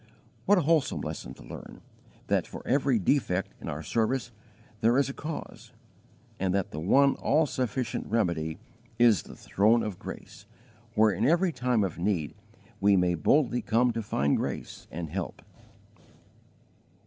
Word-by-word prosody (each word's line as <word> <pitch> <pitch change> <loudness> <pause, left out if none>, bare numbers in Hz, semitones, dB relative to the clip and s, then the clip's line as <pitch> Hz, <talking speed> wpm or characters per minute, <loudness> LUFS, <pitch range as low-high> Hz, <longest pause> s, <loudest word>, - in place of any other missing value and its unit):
What 205 - +6
a - - +4
wholesome 160 -2 +1
lesson 65 - -6
to - - -14
learn, - - -10 0.5
that - - +1
for - - -10
every 135 -1 +2
defect 95 -3 0
in - - -5
our 75 +2 -5
service 115 - -1 0.5
there 115 +4 +3
is 140 0 +2
a - - -4
cause, 150 +2 -7 0.7
and 95 0 0
that 100 -2 -1
the 75 - -5
one 135 - +4
all 155 +3 +2
sufficient 125 -3 -2
remedy 85 -8 0 0.4
is 115 - +5
the - - -12
throne 110 +4 +2
of 105 -4 -5
grace, 100 - -9 0.5
where 110 0 +5
in - - -2
every 175 +3 +3
time 125 -7 +1
of 90 -3 -3
need 85 -7 -1 0.5
we 100 0 +4
may 90 -1 +2
boldly 125 - +2
come 120 +2 +2
to 115 - -2
find 70 -9 +1
grace - - -5
and 80 -2 -6
help! 95 0 -5
110 Hz, 155 wpm, -28 LUFS, 90-130 Hz, 0.7 s, What